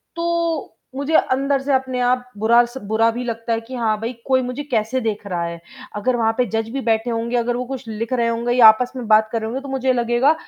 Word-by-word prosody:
तो 335 -7 -2 0.2
मुझे 285 +3 -1
अंदर 275 +1 +2
से 275 0 -1
अपने 260 -1 0
आप 250 0 0
बुरा 235 +3 +5
स 240 +2 -10
बुरा 225 +1 +3
भी 245 +2 -4
लगता 230 0 -3
है 225 - -1
कि 255 +3 -9
हाँ 220 -3 0
भाई 235 +3 -3
कोई 260 -1 +3
मुझे 250 +4 -4
कैसे 225 +3 0
देख 215 -2 -3
रहा 175 -2 -2
है। 170 0 -6 0.4
अगर 245 +4 0
वहाँ 225 -1 +2
पे 250 - +2
जज 225 +1 -2
भी 270 +2 -3
बैठे 225 0 0
होंगे, 235 +1 -1
अगर 240 +1 0
वो 250 - -3
कुछ 260 -3 -7
लिख 225 +3 -4
रहे 235 -2 +1
होंगे 235 +1 -1
या 240 -3 +8
आपस 245 +3 +5
में 245 -4 -5
बात 215 0 +4
कर 230 - -1
रहे 220 - -3
होंगे 265 +3 -4
तो 280 - -9
मुझे 265 -1 +1
लगेगा 240 +5 +2
240 Hz, 250 wpm, -20 LUFS, 225-260 Hz, 0.4 s, या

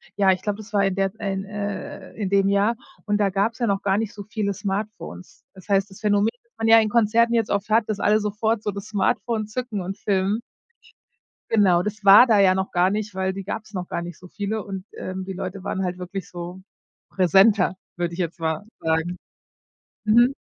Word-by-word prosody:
Ja, 195 -1 +4
ich 185 -1 -1
glaube, 205 0 -2
das 215 -1 -11
war 200 -2 +3
in 195 -1 0
der 195 -1 0
in 195 -2 -2
äh, 205 0 -6
in 205 -4 -3
dem 195 0 +3
Jahr 200 +3 +2 0.3
und 205 -1 +1
da 205 -1 +2
gab's 205 +5 0
ja 235 - +1
noch 200 -1 0
gar 195 0 +1
nicht 220 0 -2
so 205 -2 -8
viele 210 -1 -2
Smartphones. 200 - -5
Das 190 -2 -15
heißt, 200 -1 +2
das 190 - -14
Phänomen, 205 0 +2
das 235 - -40
man 225 0 -1
ja 225 0 +8
in 220 - +2
Konzerten 235 +1 +3
jetzt 225 -2 +1
oft 200 +1 -1
hat, 220 0 +2
dass 210 -2 -2
alle 210 +1 +3
sofort 210 +1 -1
so - - -1
das 200 0 -7
Smartphone 215 +2 0
zücken 225 -2 -4
und 190 +2 -5
filmen 200 +1 0 1.1
genau, 190 -6 +4
das 210 +2 -5
war 200 +6 +9
da 220 -3 +4
ja 190 -2 +6
noch 190 0 -2
gar 180 +1 +3
nicht, 210 -1 -3
weil 190 0 -1
die 195 +1 -6
gab's 205 +2 -6
noch 180 -2 -4
gar 170 - -3
nicht 170 -1 -8
so 180 - -13
viele 205 +3 -3
und, 195 -1 -7
ähm, 185 0 -5
die 190 - -5
Leute 185 +1 -6
waren 190 -1 -2
halt 180 -1 -2
wirklich 185 +1 -6
so 175 +1 -7 0.5
präsenter, 190 +1 +4 0.2
würde 175 -1 -2
ich 170 - -8
jetzt 170 0 -3
mal 160 +1 -1 0.2
sagen, 160 +2 -1 0.9
mhm. 240 +4 +5
200 Hz, 215 wpm, -23 LUFS, 190-215 Hz, 1.1 s, war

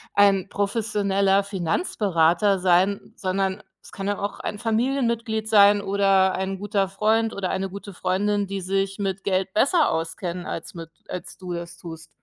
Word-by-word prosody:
ein 200 -1 +4
professioneller 200 -2 +1
Finanzberater 190 - +1
sein, 185 +2 +1
sondern 190 +1 -1 0.2
es - - -14
kann 195 0 -5
ja 205 - 0
auch 200 0 -4
ein 205 - -4
Familienmitglied 230 -2 0
sein 205 -1 +6
oder 195 -1 +3
ein 190 0 -3
guter 200 -1 0
Freund 220 +3 +1
oder 190 -2 -2
eine 190 0 -2
gute 200 +1 -9
Freundin, 200 +3 0
die 195 0 -4
sich 195 +1 -1
mit 195 -1 -3
Geld 190 -1 -1
besser 280 - +3
auskennen 170 +2 -3
als 165 - -6
mit 165 -2 -8 0.2
als 180 -1 -7
du 180 -2 -6
es 170 0 -6
tust. 160 -1 -10
195 Hz, 155 wpm, -24 LUFS, 185-205 Hz, 0.2 s, sein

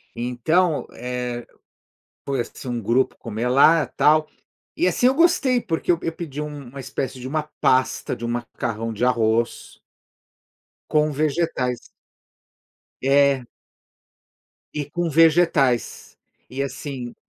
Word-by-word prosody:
Então, 150 +8 +1
eh, 125 0 -4 0.8
foi, 135 -2 -1
assim, 125 - -9
um 120 -1 -2
grupo 120 +5 +1
comer 115 +2 -4
lá, 150 +4 +5
tal. 155 +1 +3 0.5
E, 180 - +2
assim, 185 +7 +3
eu 260 - +4
gostei, 280 -6 +3
porque 165 -1 -1
eu 170 - +1
eu 165 - -2
pedi 150 -4 -6
um 145 -3 -7
uma 135 +3 -10
espécie 130 0 -4
de 125 - -6
uma 155 +3 -1 0.2
pasta 130 0 +2
de 120 - -6
um - - -2
macarrão 115 -1 -3
de 110 +3 0
arroz 115 -1 0 1.1
com 150 0 +2
vegetais. 145 -4 -1 1.1
É. 140 0 +3 1.3
E 150 -1 -3
com 175 +4 -2
vegetais, 155 -6 +2 0.3
e 135 +2 -4
assim 130 -2 -5
135 Hz, 125 wpm, -22 LUFS, 125-155 Hz, 1.3 s, lá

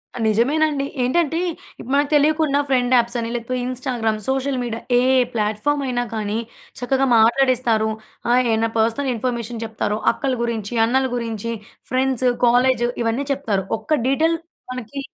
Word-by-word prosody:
ఆ! - - -6
నిజమేనండి 280 +6 +2 0.2
ఏంటంటే, 325 +5 +1 0.4
ఇప్ - - -9
మనకు 285 0 +2
తెలియకుండా 300 -1 +3
ఫ్రెండ్ 250 -1 +2
యాప్స్ 235 0 +2
అని 230 0 -3
లేకపోతే 240 +2 -3
ఇన్‌స్టాగ్రామ్, 245 -4 -2
సోషల్ 265 0 0
మీడియా 230 -1 -4 0.2
ఏ - - +3 0.3
ప్లాట్‍ఫామ్ 220 +7 0
అయినా 245 -1 0
కానీ 215 0 -2 0.4
చక్కగా 265 +2 +1
మాట్లాడేస్తారు. 235 -1 +3 0.4
ఆహ్, 250 +1 +4
ఏన్న 225 +1 +1
పర్సనల్ 230 +5 +1
ఇన్ఫర్మేషన్ 235 -1 -3
చెప్తారో 215 -1 -2 0.2
అక్కల 265 +2 -2
గురించి 230 -2 -3
అన్నల 260 +3 +2
గురించి 230 -1 -3 0.4
ఫ్రెండ్స్, 260 -1 +1 0.2
కాలేజ్ 245 0 +3 0.2
ఇవన్నీ 230 +5 -1
చెప్తారు 215 -9 -2
ఒక్క 315 - -2
డీటెయిల్ 320 +5 +2 0.3
మనకి 255 +2 -6
245 Hz, 140 wpm, -21 LUFS, 225-270 Hz, 0.4 s, ఆహ్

